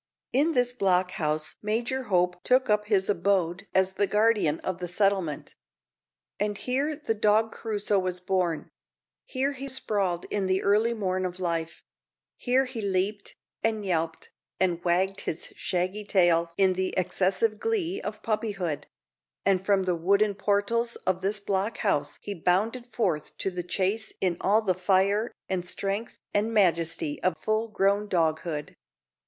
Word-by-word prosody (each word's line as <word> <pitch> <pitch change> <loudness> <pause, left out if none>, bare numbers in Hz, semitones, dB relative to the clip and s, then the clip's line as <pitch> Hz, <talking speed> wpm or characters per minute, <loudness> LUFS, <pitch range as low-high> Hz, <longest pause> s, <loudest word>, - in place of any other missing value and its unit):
In 295 +6 +3
this 245 -2 +2
block 185 -5 +2
house 155 -2 -2
Major 240 +5 -1
Hope 180 -3 +1
took 255 -2 +3
up 210 0 +2
his 200 -3 +2
abode 195 -1 0
as 190 0 +4
the 200 +1 0
guardian 210 -8 +2
of 185 -1 -3
the 180 - -4
settlement. 185 -5 0 0.9
And 205 0 -1
here 275 +7 -1
the 290 -6 -2
dog 215 +1 +2
Crusoe 210 -2 0
was 185 -1 -2
born; 180 -3 -1 0.6
here 270 +2 -1
he 275 0 -6
sprawled 200 -9 0
in 200 -2 0
the 185 0 +1
early 215 +4 +3
morn 185 -3 -1
of 180 0 -4
life; 170 -2 -3 0.5
here 260 +2 +2
he 250 -3 -5
leaped, 200 +1 -1 0.3
and 220 -2 0
yelped, 165 -3 -2 0.3
and 175 -2 +1
wagged 190 +3 +1
his 160 - -4
shaggy 185 +4 -2
tail 175 -4 +3
in 190 -1 +4
the 185 0 -2
excessive 195 +4 +1
glee 400 -4 -1
of 215 0 -6
puppyhood; 205 -8 -2 0.6
and 190 -1 +3
from 195 -1 +2
the 185 -1 +1
wooden 200 +5 +2
portals 205 +4 0
of 185 -1 +1
this 200 +2 0
block 200 +2 -1
house - - 0
he 205 - -4
bounded 205 +8 0
forth 180 -10 -1
to 195 - -1
the 180 -1 -3
chase 195 +5 -1
in 180 -2 +1
all 215 +3 +3
the 190 -3 +2
fire, 195 +4 +2 0.2
and 185 -2 -1
strength, 195 +5 -3 0.2
and 210 +2 +1
majesty 165 -7 +1
of 185 -3 +1
full 215 +4 0
grown 205 -1 +1
doghood. 160 -3 -1
195 Hz, 155 wpm, -27 LUFS, 180-215 Hz, 0.9 s, as